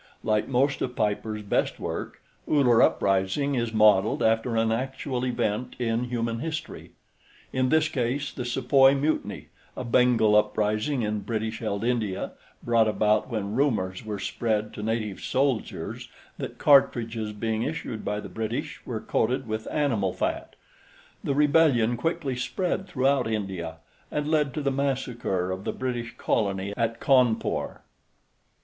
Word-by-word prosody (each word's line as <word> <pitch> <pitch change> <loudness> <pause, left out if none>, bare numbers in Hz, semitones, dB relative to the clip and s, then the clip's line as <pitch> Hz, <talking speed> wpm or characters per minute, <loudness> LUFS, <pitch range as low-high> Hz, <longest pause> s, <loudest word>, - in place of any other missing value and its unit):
Like 110 -1 +1
most 135 +2 +1
of 125 -1 -2
Piper's 105 0 -1
best 100 - 0
work, - - -5 0.2
Uller 125 -6 +4
Uprising 95 +9 +2
is 120 -3 -1
modeled 105 -2 +4
after 115 +1 +2
an 115 0 +2
actual 130 +1 -2
event 120 -1 -1
in 115 0 0
human 115 -1 -2
history; 160 +3 -6 0.6
in 130 0 +1
this 160 +1 +3
case 135 0 -2
the 125 - -4
Sepoy 135 +2 +4
Mutiny 150 +3 -2 0.3
(a 130 - -3
Bengal 120 -3 +4
uprising 110 +5 +1
in 105 0 -1
British 110 0 -3
held 105 -2 -2
India 115 -5 -1 0.3
brought 115 -2 +3
about 105 +1 +2
when 105 -4 -3
rumors 110 -9 0
were 105 -1 -4
spread 105 +2 -1
to - - -7
native 110 -2 -2
soldiers 130 -3 -2 0.3
that - - -5
cartridges 115 -6 +3
being 110 +1 -2
issued 110 -1 -4
by 105 0 -2
the 105 - -7
British 110 +5 -4
were 110 -4 -3
coated 125 +3 0
with 110 0 -4
animal 115 -11 0
fat. - - -3 0.7
The 140 - 0
rebellion 145 -6 +4
quickly 160 -1 -2
spread 185 +8 -2
throughout 135 -3 +1
India 95 -6 -3 0.3
and 150 0 -2
led 150 -3 +1
to 155 - -1
the 140 - +1
massacre 125 -9 -1
of 95 +1 -4
the - - -2
British 120 -2 -4
Colony 100 -2 -1
at 115 0 -1
Cawnpore.). 125 -4 +2
115 Hz, 140 wpm, -26 LUFS, 105-135 Hz, 0.7 s, Uller